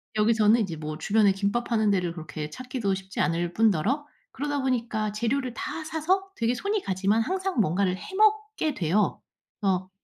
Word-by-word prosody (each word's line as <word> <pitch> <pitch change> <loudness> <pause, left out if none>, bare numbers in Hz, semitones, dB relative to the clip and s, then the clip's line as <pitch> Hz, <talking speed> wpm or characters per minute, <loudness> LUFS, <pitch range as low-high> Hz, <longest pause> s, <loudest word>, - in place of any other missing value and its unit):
여기서는 220 +1 +4
이제 185 -6 -2
뭐 155 0 -5
주변에 205 +5 +3
김밥 200 +5 -1
파는 220 -3 +2
데를 180 -4 0
그렇게 155 -2 -6
찾기도 250 - -2
쉽지 190 0 -6
않을 170 0 0
뿐더러 225 - +2 0.3
그러다 290 0 -2
보니까 230 -5 -1
재료를 235 +4 -1
다 315 +6 -5
사서 360 +5 0
되게 230 +1 +1
손이 405 +7 -1
가지만 195 - +1
항상 375 +4 -1
뭔가를 185 +1 +1
해 380 - -9
먹게 430 -6 +2
돼요. 190 0 +1 0.4
그래서 185 -2 0
220 Hz, 365 characters per minute, -26 LUFS, 190-270 Hz, 0.4 s, 여기서는